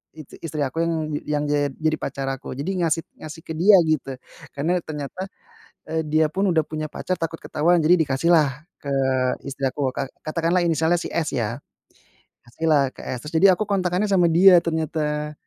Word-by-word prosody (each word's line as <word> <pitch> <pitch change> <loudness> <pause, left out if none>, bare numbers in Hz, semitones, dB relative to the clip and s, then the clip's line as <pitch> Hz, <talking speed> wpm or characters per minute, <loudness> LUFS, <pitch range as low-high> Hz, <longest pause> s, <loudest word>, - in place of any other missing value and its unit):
i 155 - -9 0.2
istri 155 -2 -4
aku 135 +5 -3
yang 165 - 0 0.3
yang 150 -1 0
jad 145 -1 +1
jadi 155 0 0
pacar 135 -1 -4
aku 135 - -7
jadi 145 +7 -3
ngasih 165 0 0 0.2
ngasih 155 +1 -9
ke 160 - -4
dia 195 +4 +7
gitu, 155 -3 -1 0.5
karena 170 +6 +1
ternyata, 150 +3 -6 0.7
eee, 160 0 0
dia 155 +1 +3
pun 195 +4 0
udah 160 -2 +2
punya 155 0 -4
pacar 185 +4 -3
takut 165 0 -3
ketahuan, 170 +3 +2
jadi 170 +4 +6
dikasih 145 +1 0
lah 150 -3 +4 0.3
ke 140 - -6 0.6
istri 140 0 -7
aku. 135 0 -2
Kat 135 - -2 0.2
katakanlah 165 +3 +1
inisialnya 165 +1 +2
si - - -5
S, 160 -3 -1
ya 115 +1 -2 0.9
Kasihlah 140 +2 +1
ke - - -10
S, 125 +1 -6
terus 150 - -8
jadi 200 - +8
aku 215 - -1
kontakannya 185 0 +1
sama 180 -3 +4
dia 180 +2 +7
ternyata, 150 -2 -2
160 Hz, 180 wpm, -23 LUFS, 150-170 Hz, 0.9 s, jadi